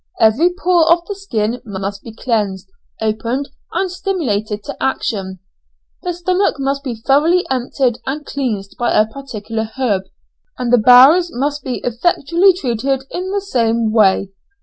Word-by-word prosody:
Every 245 Hz, +11 st, +4 dB
pore 345 Hz, -3 st, +3 dB
of 340 Hz, 0 st, +3 dB
the 405 Hz, -, -4 dB
skin 240 Hz, -, -2 dB
must 200 Hz, -2 st, -5 dB
be 230 Hz, -, -10 dB
cleansed, 205 Hz, -5 st, -2 dB, 0.3 s
opened, 230 Hz, +6 st, -2 dB, 0.2 s
and 380 Hz, -2 st, -1 dB
stimulated 240 Hz, -, -2 dB
to -, -, -6 dB
action. 195 Hz, -8 st, -2 dB, 0.6 s
The 360 Hz, -, -2 dB
stomach 365 Hz, +3 st, 0 dB
must 275 Hz, 0 st, -2 dB
be 255 Hz, -5 st, -4 dB
thoroughly 295 Hz, +10 st, +2 dB
emptied 255 Hz, -1 st, 0 dB
and 290 Hz, +2 st, -3 dB
cleansed 220 Hz, -8 st, -4 dB
by 240 Hz, -, +2 dB
a 215 Hz, -, +5 dB
particular 220 Hz, -3 st, -6 dB
herb, 205 Hz, -8 st, 0 dB, 0.5 s
and 245 Hz, -1 st, -1 dB
the 245 Hz, -, +6 dB
bowels 260 Hz, +10 st, +7 dB
must 285 Hz, +4 st, -2 dB
be 255 Hz, -2 st, -4 dB
effectually 340 Hz, -, +2 dB
treated 265 Hz, -4 st, -1 dB
in 365 Hz, +1 st, -4 dB
the 400 Hz, +1 st, -1 dB
same 230 Hz, -, 0 dB
way. 200 Hz, -3 st, +3 dB
250 Hz, 150 wpm, -17 LUFS, 220-325 Hz, 0.6 s, bowels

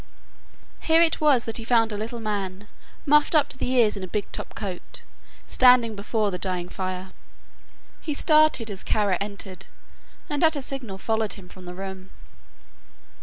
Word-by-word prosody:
Here 320 Hz, 0 st, +3 dB
it 325 Hz, -1 st, +1 dB
was 280 Hz, -6 st, +4 dB
that 225 Hz, -, 0 dB
he 230 Hz, -, -5 dB
found 225 Hz, -1 st, +3 dB
a -, -, -2 dB
little 225 Hz, +3 st, -5 dB
man 205 Hz, -2 st, -4 dB, 0.4 s
muffled 300 Hz, +2 st, +4 dB
up 295 Hz, -1 st, +4 dB
to -, -, -4 dB
the -, -, -2 dB
ears 230 Hz, -5 st, +4 dB
in 195 Hz, -, -6 dB
a -, -, -4 dB
big 205 Hz, +2 st, -4 dB
top -, -, -6 dB
coat, 190 Hz, -5 st, -7 dB, 0.4 s
standing 250 Hz, -3 st, +5 dB
before 210 Hz, +1 st, -1 dB
the 180 Hz, -, -4 dB
dying 180 Hz, -2 st, -2 dB
fire. 185 Hz, 0 st, -5 dB, 0.9 s
He 300 Hz, -, -3 dB
started 305 Hz, -, +3 dB
as 190 Hz, -, -6 dB
Kara 205 Hz, -4 st, +1 dB
entered 200 Hz, -2 st, -7 dB, 0.6 s
and 290 Hz, +1 st, -1 dB
at 320 Hz, -1 st, +4 dB
a 285 Hz, -, -3 dB
signal 255 Hz, -8 st, -6 dB
followed 220 Hz, 0 st, -1 dB
him 190 Hz, -3 st, -11 dB
from 185 Hz, -1 st, -13 dB
the 180 Hz, 0 st, -8 dB
room. 190 Hz, 0 st, -7 dB
215 Hz, 170 wpm, -25 LUFS, 190-255 Hz, 0.9 s, standing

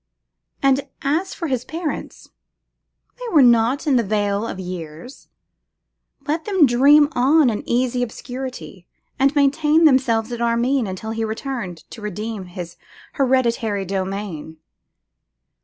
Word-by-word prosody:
And 275 Hz, +1 st, +2 dB, 0.2 s
as 320 Hz, +7 st, -1 dB
for 340 Hz, -, -5 dB
his 260 Hz, -6 st, -1 dB
parents, 320 Hz, +3 st, -6 dB, 0.9 s
they -, -, -6 dB
were 290 Hz, -, +7 dB
not 240 Hz, +4 st, +3 dB
in 280 Hz, -4 st, +3 dB
the 235 Hz, -, +2 dB
vale 205 Hz, +1 st, -1 dB
of 190 Hz, -, -6 dB
years; 180 Hz, -, -8 dB, 1.0 s
let 315 Hz, +2 st, -2 dB
them 385 Hz, -7 st, +4 dB
dream 280 Hz, +4 st, +5 dB
on 275 Hz, +1 st, +3 dB
in 210 Hz, -, -3 dB
easy 250 Hz, +1 st, +1 dB
obscurity, 245 Hz, -5 st, -7 dB, 0.3 s
and 275 Hz, +2 st, +3 dB
maintain 300 Hz, +3 st, +3 dB
themselves 250 Hz, -5 st, +3 dB
at 240 Hz, -1 st, -5 dB
Armine 235 Hz, +1 st, +1 dB
until 190 Hz, +4 st, -5 dB
he 225 Hz, 0 st, -2 dB
returned 220 Hz, -5 st, -5 dB
to 225 Hz, -, -10 dB
redeem 210 Hz, 0 st, -5 dB
his 175 Hz, -1 st, -8 dB, 0.4 s
hereditary 235 Hz, -6 st, 0 dB
domain. 190 Hz, -4 st, -4 dB
240 Hz, 125 wpm, -21 LUFS, 205-275 Hz, 1.0 s, were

